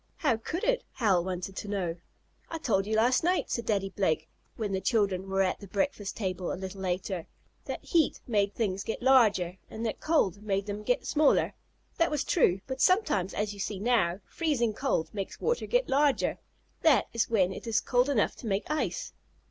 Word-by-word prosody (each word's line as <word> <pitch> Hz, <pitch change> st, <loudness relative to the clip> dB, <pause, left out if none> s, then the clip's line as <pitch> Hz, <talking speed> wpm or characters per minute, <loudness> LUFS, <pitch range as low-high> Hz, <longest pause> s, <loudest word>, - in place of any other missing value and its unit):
"How 280 Hz, -8 st, +2 dB
could 325 Hz, +10 st, -4 dB
it?" -, -, +1 dB
Hal 195 Hz, -8 st, +2 dB
wanted 185 Hz, +1 st, -4 dB
to -, -, -5 dB
know. 185 Hz, -5 st, -2 dB, 0.5 s
"I 330 Hz, -, -4 dB
told 200 Hz, -10 st, 0 dB
you 220 Hz, -, 0 dB
last 245 Hz, +5 st, +3 dB
night," 360 Hz, +2 st, +1 dB
said 235 Hz, -2 st, -2 dB
Daddy 195 Hz, -3 st, +1 dB
Blake, 160 Hz, -5 st, 0 dB, 0.3 s
when 215 Hz, -3 st, -3 dB
the 190 Hz, -1 st, -1 dB
children 195 Hz, -5 st, +1 dB
were 195 Hz, 0 st, +2 dB
at 190 Hz, 0 st, -3 dB
breakfast 205 Hz, -2 st, -1 dB
table 185 Hz, -4 st, -2 dB
a -, -, -2 dB
little 190 Hz, +1 st, -7 dB
later, 185 Hz, -1 st, -2 dB, 0.4 s
"that -, -, -5 dB
heat 330 Hz, -4 st, +2 dB
made 205 Hz, -4 st, +1 dB
things 195 Hz, -4 st, -1 dB
get 225 Hz, -, -4 dB
larger, 210 Hz, -9 st, +4 dB
and 225 Hz, +1 st, -5 dB
that 220 Hz, -, -2 dB
cold 205 Hz, -, +1 dB
made 200 Hz, -2 st, -1 dB
them 205 Hz, 0 st, -4 dB
get 245 Hz, +4 st, 0 dB
smaller. 300 Hz, -1 st, +3 dB, 0.5 s
That 335 Hz, 0 st, +4 dB
was 295 Hz, -2 st, -1 dB
true, 195 Hz, -, +2 dB
but 260 Hz, 0 st, -4 dB
sometimes, 365 Hz, -, +2 dB
as 210 Hz, 0 st, -1 dB
you 200 Hz, -, -12 dB
see 195 Hz, +1 st, -3 dB
now, 205 Hz, -5 st, +1 dB
freezing 270 Hz, -9 st, 0 dB
cold 205 Hz, -, -1 dB
makes 195 Hz, -2 st, -5 dB
water 475 Hz, +1 st, 0 dB
get -, -, +2 dB
larger. 280 Hz, +1 st, +2 dB, 0.4 s
That 290 Hz, -9 st, +5 dB
is 230 Hz, -1 st, 0 dB
when 190 Hz, -5 st, +2 dB
it -, -, -9 dB
is 225 Hz, 0 st, +2 dB
cold 245 Hz, +3 st, +2 dB
enough 245 Hz, -7 st, +1 dB
to 235 Hz, -, -8 dB
make 200 Hz, 0 st, 0 dB
ice. 310 Hz, +10 st, -2 dB
210 Hz, 195 wpm, -29 LUFS, 195-260 Hz, 0.5 s, That